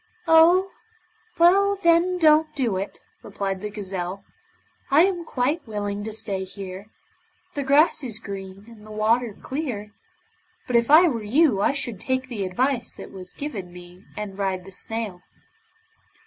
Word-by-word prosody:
'Oh! 345 +4 +6 0.7
well 395 +4 +5
then 355 -1 +3
don't 310 -2 +4
do 245 -8 0
it,' 195 +2 -4 0.2
replied 195 -2 -4
the 210 - -4
gazelle, 195 -2 -5 0.7
'I 295 +4 +6
am 360 -3 0
quite 275 +3 -1
willing 205 -1 -3
to 220 - -4
stay 200 -3 -4
here. 190 +1 -8 0.7
The 285 - -2
grass 285 +3 +3
is 230 -5 -2
green, 195 -2 -8
and 230 -3 -14
the 215 - -13
water 215 +1 +1
clear. 250 -8 -4 0.7
But 250 - -2
if 235 +1 +3
I 325 +4 +8
were 240 -8 -1
you 235 0 +3
I 235 - +3
should 240 -8 -4
take 260 +2 -2
the 205 -6 -3
advice 245 +5 0
that - - -11
was 185 -2 -9
given 210 -12 -6
me 180 +1 -13
and 205 -2 -6
ride 190 -2 -2
the 195 - -11
snail. 215 -2 -4
225 Hz, 155 wpm, -24 LUFS, 195-300 Hz, 0.7 s, I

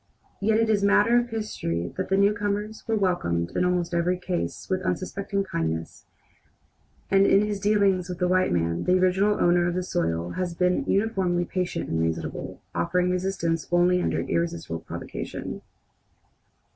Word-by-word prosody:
Yet 215 +2 +2
it 225 - +2
is 210 -2 +2
matter 210 +4 +5
of 240 0 -3
history 90 - -3
that - - -3
the 195 - +3
newcomers 205 +1 0
were 225 - +1
welcomed 85 - 0
in - - +2
almost 180 -1 0
every 175 +1 +1
case 180 -1 -4
with 185 -1 -1
unsuspecting 190 +2 -2
kindness, 80 - -4 1.0
and 195 0 +5
in 200 +2 +4
his 205 -1 -3
dealings 195 -3 +2
with 180 - -4
the 180 0 +1
white 185 0 +2
man 85 -1 0
the 180 0 +4
original 190 +3 +2
owner 175 0 +3
of 175 - -1
the 185 - -1
soil 85 - -1
has 175 - -3
been 180 +1 +1
uniformly 190 -4 +1
patient 180 0 -3
and 80 0 -1
reasonable, 80 0 -3
offering 180 +1 +1
resistance 180 -3 -1
only 180 +1 +4
under - - 0
irresistible 170 - -2
provocation. - - -6
180 Hz, 160 wpm, -25 LUFS, 170-200 Hz, 1.0 s, matter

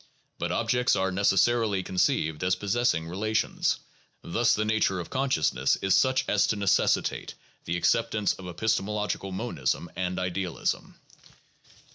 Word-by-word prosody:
But 85 0 -2
objects 120 +5 +1
are 95 0 0
necessarily 100 +1 +2
conceived 80 -4 0
as 90 0 +2
possessing 100 -3 0
relations. 110 +5 0 0.5
Thus 115 +7 +2
the 105 - -1
nature 110 -4 +1
of 85 - -7
consciousness 80 - +1
is 95 -1 0
such 130 +7 +3
as 105 - +2
to - - 0
necessitate 100 -3 +1 0.3
the 85 +1 -1
acceptance 110 +2 +1
of 95 - -10
epistemological 105 +1 -2
monism 85 -2 -2
and 90 0 -2
idealism. 90 -1 -3
95 Hz, 125 wpm, -27 LUFS, 90-110 Hz, 0.5 s, such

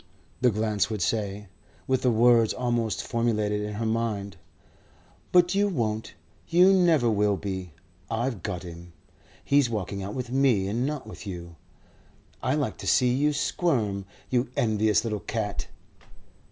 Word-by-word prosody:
the 125 - +5
glance 110 -1 0
would 110 -2 -3
say, 105 +1 -1 0.4
with 130 -1 +1
the 125 - +3
words 115 -1 +4
almost 120 -3 -1
formulated 110 -3 0
in 105 0 -4
her 115 +2 -2
mind. 110 -4 -2 1.0
"But 180 0 +5
you 200 +1 +3
won't. 110 - -2 0.3
You 180 +3 +6
never 170 -9 +4
will 105 -2 +2
be. 95 -4 -5 0.4
I've 115 -2 -2
got 90 0 -4
him. 85 0 -10 0.5
He's 140 -3 +3
walking 100 -3 -3
out 100 +2 -5
with 125 -2 -4
me 130 -8 +3
and 120 +6 -1
not 150 -4 -4
with 110 -1 -10
you. 85 -3 -7 0.9
I - - +1
like - - -2
to - - -6
see 125 -1 +4
you 145 +3 +2
squirm, 120 - 0 0.3
you 125 -1 +1
envious 110 -2 +2
little 110 -3 -2
cat." 105 -2 -3
110 Hz, 150 wpm, -26 LUFS, 105-125 Hz, 1.0 s, You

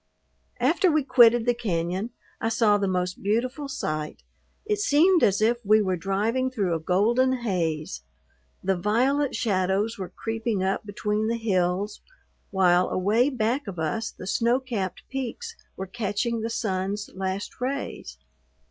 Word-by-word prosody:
After 320 +9 +3
we 305 -1 +2
quitted 240 -3 +5
the 245 - +3
cañon 190 -2 -2 0.3
I 225 - +1
saw 215 -3 +3
the 200 - 0
most 180 -1 -2
beautiful 250 +8 -1
sight. 155 - -4 0.4
It 420 -1 0
seemed 350 -1 +4
as 205 +2 +3
if 240 +2 +1
we 215 +1 +5
were 190 -3 +1
driving 210 +8 0
through 200 -9 -1
a 165 - -1
golden 225 +10 +2
haze. 165 - -2 0.6
The 190 0 +1
violet 250 +9 +1
shadows 200 +1 0
were 185 -2 -4
creeping 225 -1 -2
up 195 +3 -1
between 210 +1 -1
the 230 +1 0
hills, 195 -1 -1 0.5
while 180 -2 +3
away 215 +8 +2
back 245 0 -1
of 190 -3 -6
us 160 +8 -2
the - - -10
snow 235 +6 +2
capped 225 -8 -4
peaks 265 -3 -5 0.2
were 190 - -4
catching 220 +3 -2
the 225 - -2
sun's 205 -2 -2
last 190 +4 -4
rays. 275 +2 -4
215 Hz, 150 wpm, -25 LUFS, 190-240 Hz, 0.6 s, quitted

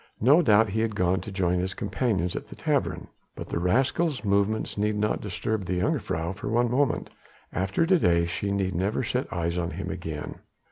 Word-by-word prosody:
No 140 +9 +6
doubt 110 -6 +4
he 110 +3 -1
had 110 -1 0
gone 90 0 +1
to 110 - -7
join 90 -2 +1
his 90 +1 -2
companions 100 -4 -1
at - - -5
the - - -11
tavern. - - -1 0.3
But - - -7
the - - -1
rascal's 130 - +1
movements 100 +2 +1
need 105 +1 0
not 105 0 0
disturb 105 +1 -2
the 90 0 -1
jongejuffrouw 85 -1 -1
for - - -4
one 120 +1 +2
moment. 135 0 +1 0.4
After 95 - +1
to 180 +1 +4
day 85 - +3
she 100 +4 -2
need 95 -1 0
never 100 +8 0
set 125 +3 -2
eyes 85 0 -1
on 85 -1 -1
him 95 +2 -5
again." 80 -5 -6
100 Hz, 195 wpm, -26 LUFS, 90-110 Hz, 0.4 s, No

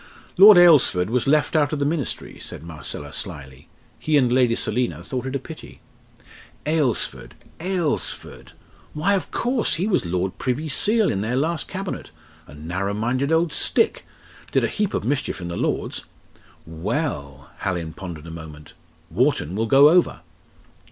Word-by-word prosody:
"Lord 200 +1 +9
Alresford 140 - +5
was 125 +1 +1
left 150 +3 +2
out 145 -2 +3
of 155 - -1
the 140 - 0
Ministry," 150 -2 -3
said - - -8
Marcella 75 -2 -8
slily. 70 -6 -8 0.3
"He 155 -1 +2
and 125 -3 +3
Lady 125 -2 +3
Selina 105 -10 -2
thought 130 +7 -4
it 130 - -4
a - - 0
pity." 155 +4 -11 0.9
"Alresford 150 -7 -1 0.2
Alresford? 165 - -3 0.4
Why, 180 +7 +1
of 195 - -1
course! 245 0 0
He 180 - -1
was 210 -3 +1
Lord 90 +2 -2
Privy 135 +5 -2
Seal 215 +7 +3
in 95 - -2
their 115 +4 -1
last 155 +3 -1
Cabinet 190 0 -5 0.4
a - - -13
narrow 90 +7 -3
minded 130 +7 -1
old 160 0 +2
stick! 450 - +1 0.5
did - - +2
a - - +2
heap 210 -2 -2
of - - -2
mischief 135 +1 -2
in 85 -1 -6
the 85 - -4
Lords. - - -2 0.6
Well!" 80 - -4
Hallin 85 -4 -3
pondered 85 -5 -8
a 80 - -8
moment 80 -2 -10 0.4
"Wharton 75 +4 +1
will 110 +2 -1
go 140 +5 +7
over!" 175 +2 +2
125 Hz, 160 wpm, -22 LUFS, -, 0.9 s, Lord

